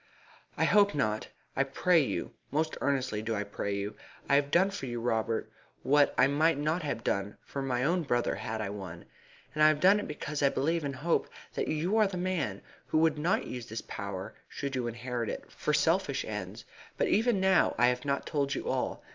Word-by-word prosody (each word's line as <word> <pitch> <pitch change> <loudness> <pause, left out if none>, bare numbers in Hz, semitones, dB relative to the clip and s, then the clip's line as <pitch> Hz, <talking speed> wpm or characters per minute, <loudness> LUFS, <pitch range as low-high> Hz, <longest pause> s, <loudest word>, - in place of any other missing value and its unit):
"I - - +2
hope 205 -4 +4
not 110 -6 0 0.3
I 135 - +3
pray 150 +2 +2
not - - -5 0.2
most 155 +3 0
earnestly 130 -6 0
do 110 +1 -2
I 100 - -1
pray 100 0 -3
not. 105 - -6 0.4
I - - +3
have 140 0 +4
done 190 +6 +4
for 165 -9 -5
you, 120 -1 -3
Robert, 115 -1 -1 0.3
what 145 +1 +4
I - - +6
might 145 +3 +3
not 155 +4 0
have 140 -7 -3
done 100 +1 -1
for 140 - -5
my 125 -2 0
own 175 +6 +2
brother 120 -6 0
had 110 0 -4
I 100 -2 -3
one, 95 -4 -8 0.5
and 155 - -2
I 155 - +8
have 155 -1 +3
done 195 +5 +6
it - - -4
because 150 0 -4
I 140 - +5
believe 160 +5 0
and 140 -1 -3
hope 165 +6 0 0.2
that - - -2
you 170 +8 0
are 215 -3 +4
a 185 - -4
man 170 - -2 0.2
who - - +1
would 160 -1 +3
not 170 +5 +1
use 125 -1 -6
this 110 -1 -5
power, 100 0 -6 0.2
should 140 -1 -4
you 125 -2 -1
inherit 120 0 -3
it, - - -6
for - - -2
selfish - - +2
ends. - - -6 0.3
But - - +2
even 225 -1 +3
now 190 -1 +3
I 120 - +5
have 125 0 -2
not 140 -1 -1
told 140 -2 -1
you - - -4
all. - - -2
140 Hz, 215 wpm, -30 LUFS, 115-160 Hz, 0.5 s, I